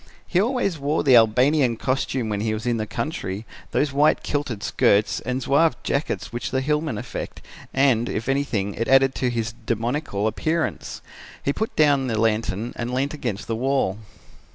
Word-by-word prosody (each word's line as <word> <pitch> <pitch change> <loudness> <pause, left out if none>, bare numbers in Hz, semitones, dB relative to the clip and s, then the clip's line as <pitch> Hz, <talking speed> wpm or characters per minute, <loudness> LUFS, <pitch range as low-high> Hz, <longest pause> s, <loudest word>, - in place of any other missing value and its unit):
He 180 - +2
always 225 - 0
wore 145 +3 0
the 135 -4 +6
Albanian 125 +3 +4
costume 130 -1 -1
when 105 -1 -2
he 110 0 0
was 110 - -6
in 120 -1 +1
the 110 -1 -3
country, 110 - -4 0.2
those 145 -2 0
white 150 +2 +3
kilted 135 -8 -3
skirts 100 +1 +2
and 130 +1 -3
zouave 160 +4 +3
jackets 140 -3 -2
which 120 - -3
the 130 - 0
hillsmen 150 -3 -1
affect - - -6 0.3
and, 130 -4 +2
if 115 - -3
anything, 125 -8 0
it 115 - -3
added 135 0 +5
to 125 - 0
his 115 -1 -2
demoniacal 115 -1 -1
appearance. 160 +9 -2 0.4
He 140 - +1
put 220 +7 -3
down 145 -3 +3
the 110 -3 -1
lantern 110 0 0
and 120 +1 -3
leant 135 +3 -1
against 120 -9 -4
the 115 - -2
wall. 125 -5 0
125 Hz, 175 wpm, -23 LUFS, 110-145 Hz, 0.4 s, the